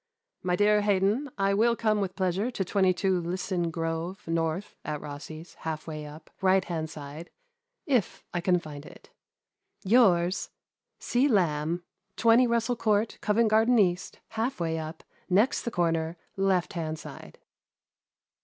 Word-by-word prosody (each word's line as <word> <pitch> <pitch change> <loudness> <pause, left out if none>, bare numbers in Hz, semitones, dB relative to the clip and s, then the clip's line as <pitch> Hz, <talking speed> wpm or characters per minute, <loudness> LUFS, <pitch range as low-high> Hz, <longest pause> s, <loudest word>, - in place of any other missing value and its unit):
" - - -59
My 180 -1 +1
dear 210 +2 +4
Haydon, 205 +7 +1
— - - -41
I 195 0 +2
will 230 +3 +3
come 215 -2 +1
with 190 -1 -3
pleasure 190 +4 0
to 200 -6 -3
22 190 -1 +2
Lia 175 +2 -3
son 180 -2 -1
Grove, 165 +3 -4
North, 165 +3 -1
at 150 -1 -3
Rossi's, 150 +3 -9
half 160 -1 -4
way 155 -2 -6
up, 155 +1 -12
right 190 0 +3
hand 160 -2 -3
side, 150 +2 -9 0.6
if 250 -9 0
I 175 - -1
can 180 +1 +3
find 150 -4 -8
it. - - -15 0.4
" - - -38
Yours, 185 -5 +4 0.5
0. 260 +3 +2
Lamb. 165 -1 0 0.2
" 195 -1 -52
20 235 +2 +5
Rassel 235 +1 +1
Court, 215 0 +1
Covent 220 +1 +2
Garden 225 +3 +4
East, 180 -3 +1
half 225 +2 -2
way 165 -1 -1
up, 160 +1 -7 0.3
next 210 +8 +3
the - - -3
cor 175 -6 +1
ner, 165 +1 -2 0.2
left 195 -2 +1
hand 160 -3 -3
side." - - -11
185 Hz, 165 wpm, -28 LUFS, 165-210 Hz, 0.6 s, 20